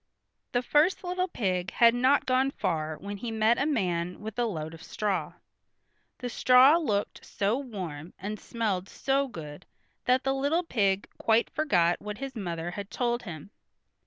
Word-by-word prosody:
The 245 0 +1
first 300 +10 +3
little 365 +1 -1
pig 185 - -1
had 235 -1 +6
not 260 +4 +3
gone 260 +1 +2
far 160 - -2
when 200 +1 -6
he 235 +4 -5
met 225 +1 +2
a 285 - +1
man 180 - -1
with 220 +2 -6
a 240 - +2
load 160 -7 -4
of 165 - -11
straw. 185 -5 -2 0.8
The 250 - -5
straw 255 +5 +6
looked 210 -12 -2
so 205 +6 -1
warm, 180 - -6
and 210 +2 -5
smelled 200 -5 -2
so 275 +1 0
good 150 - -9 0.4
that 255 +1 +3
the 270 - +1
little 285 +6 +1
pig 200 - +1
quite 225 +1 +2
forgot 180 - +2
what 210 0 -6
his 270 -1 -6
mother 175 -5 -4
had 200 +2 -6
told 240 -1 -1
him. 175 -3 -9
220 Hz, 165 wpm, -28 LUFS, 180-260 Hz, 0.8 s, had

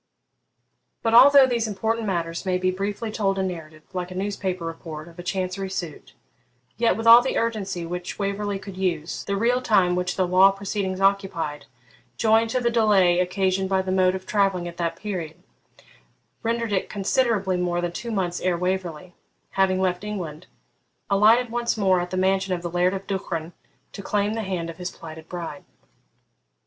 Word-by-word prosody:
But 225 - +1
although 275 +3 +9
these 235 -3 0
important 220 +2 -2
matters 170 -3 -2
may 185 -2 0
be 185 0 +1
briefly 205 +4 -3
told 195 -3 0
in 190 0 0
narrative, 160 -3 -8
like 180 -1 -3
a 185 - -9
newspaper 190 -2 -3
report 165 -1 -7
of 170 +1 -15
a - - -4
Chancery 185 +1 -3
suit, 175 -5 -6 0.6
yet, 230 -1 +2
with 225 - -4
all 230 +1 +10
the 260 - -2
urgency 200 -6 -2
which 180 +1 -5
Waverley 200 0 -2
could 195 -1 -9
use, 170 -4 -2
the 200 - -1
real 245 +4 +2
time 195 -7 +3
which 180 0 -1
the 185 - +1
law 185 +2 +6
proceedings 195 -1 -3
occupied, 190 -7 0 0.5
joined 225 0 +3
to 255 - 0
the 240 -1 +1
delay 200 -6 +4
occasioned 190 +1 0
by 190 -1 +1
the 185 - -3
mode 185 0 +3
of 190 0 -7
travelling 195 -4 +1
at 170 0 -9
that 170 -1 -1
period, 180 -5 -5 1.0
rendered 230 -1 -1
it 190 - -1
considerably 205 -2 +1
more 175 -1 -1
than 175 0 -2
two 235 +7 -6
months 185 -5 -2
ere 180 -1 +1
Waverley, 180 -1 -3 0.4
having 190 -1 +2
left 185 0 0
England, 180 -6 -6 0.6
alighted 225 +4 +4
once 240 -1 -1
more 190 -3 +3
at 175 - -4
the 185 - -3
mansion 190 0 +1
of 175 - -8
the 170 - -4
Laird 180 +2 +2
of 195 0 -6
Duchran 175 -4 -4 0.4
to - - -8
claim 205 +1 0
the 225 - -2
hand 185 -5 -3
of 165 - -15
his 180 0 -4
plighted 160 -1 -11
bride. 170 -5 -6
190 Hz, 180 wpm, -24 LUFS, 180-205 Hz, 1.0 s, all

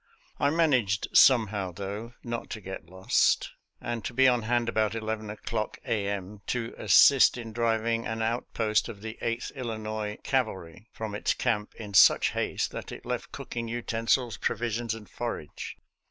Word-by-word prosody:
I 140 - +3
managed 130 - +2
somehow, 105 -7 +5
though, 100 +5 -6
not 120 -1 -4
to 110 - -5
get 95 -4 -8
lost, 95 +1 +2 0.3
and 120 -2 -4
to 120 - -4
be 130 +1 +6
on 125 -2 +3
hand 120 +1 0
about 110 -1 +1
11 110 -1 -3
o'clock 110 +1 -4
a. 105 -3 0
m., 100 0 -4
to 120 -2 -2
assist 135 -2 +6
in 115 -2 -7
driving 115 0 0
an 110 0 -2
outpost 110 -1 0
of 105 -4 -9
the 110 0 -7
Eighth 115 +1 -2
Illinois 110 -4 -4
Cavalry 110 -6 -2
from 110 -2 -5
its 105 - 0
camp 110 -4 -1
in 105 -3 -8
such 95 - +6
haste - - -1
that - - -7
it - - -9
left - - -4
cooking 115 -1 -5
utensils, 115 +1 0
provisions, 115 0 -1
and 110 -2 -11
forage. 115 -11 -6
110 Hz, 160 wpm, -28 LUFS, 105-120 Hz, 0.3 s, be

